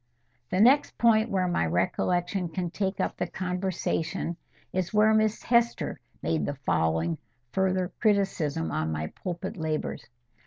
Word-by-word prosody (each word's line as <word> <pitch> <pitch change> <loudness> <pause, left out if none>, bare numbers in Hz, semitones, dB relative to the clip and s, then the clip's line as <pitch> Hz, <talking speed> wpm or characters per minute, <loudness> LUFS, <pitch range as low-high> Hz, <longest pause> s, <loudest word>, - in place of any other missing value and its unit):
The 185 - 0
next 260 +7 +5
point 225 -1 +4
where 190 -3 +1
my 175 - +1
recollection 175 - 0
can 175 +1 -3
take 190 0 -2
up - - -1
the 180 - -1
conversation, 180 -2 -2 0.4
is 185 -1 -1
where 215 +1 +5
Miss 215 0 +2
Hester 235 -1 +1 0.2
made 80 -1 0
the 145 - -2
following 80 +1 +1 0.3
further 185 -1 +1
criticism 190 - +1
on 80 +1 -1
my 80 0 -3
pulpit 180 +3 -4
labours. 155 -2 -3
180 Hz, 140 wpm, -28 LUFS, 150-200 Hz, 0.4 s, next